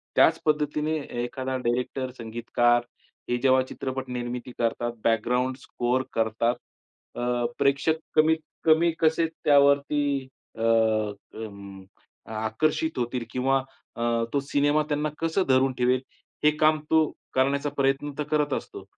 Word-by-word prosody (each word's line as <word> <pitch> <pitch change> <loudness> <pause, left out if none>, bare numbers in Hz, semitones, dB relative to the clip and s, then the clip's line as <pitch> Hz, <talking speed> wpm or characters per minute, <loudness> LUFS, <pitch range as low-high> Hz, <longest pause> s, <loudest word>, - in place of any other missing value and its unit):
त्याच - - +5
पद्धतीने 150 0 +1
ए 120 -4 -5
एखादा 130 +1 -3
डायरेक्टर, 125 +1 -2
संगीतकार 120 +1 +1 0.5
हे 120 - +1
जेव्हा 130 -1 +5
चित्रपट 130 0 -5
निर्मिती 125 0 -4
करतात, 120 0 0
बॅकग्राउंड 125 +3 +1
स्कोर 125 +2 -1
करतात 115 +2 +1 0.6
अ, - - -4 0.4
प्रेक्षक 140 +3 +2 0.2
कमीत 160 +1 +4 0.3
कमी 165 +1 +5
कसे 160 0 +3
त्यावरती 140 -2 +2 0.3
अ, 110 - -7
अं, 110 -3 -1 0.5
आकर्षित 120 +8 -1
होतील 120 0 -2
किंवा 135 +2 +2 0.4
अ, - - -6 0.3
तो 140 - +3
सिनेमा 145 +2 +2
त्यांना 150 +1 0
कसं 165 +4 +1
धरून 130 0 +4
ठेवेल, 125 +1 +2 0.4
हे 150 - +6
काम 155 0 +4
तो 160 0 +6 0.3
करण्याचा 140 +2 +2
प्रयत्न 135 +1 +1
तर - - +1
करत 150 -2 +1
असतो. - - -5
130 Hz, 125 wpm, -26 LUFS, 120-150 Hz, 0.6 s, हे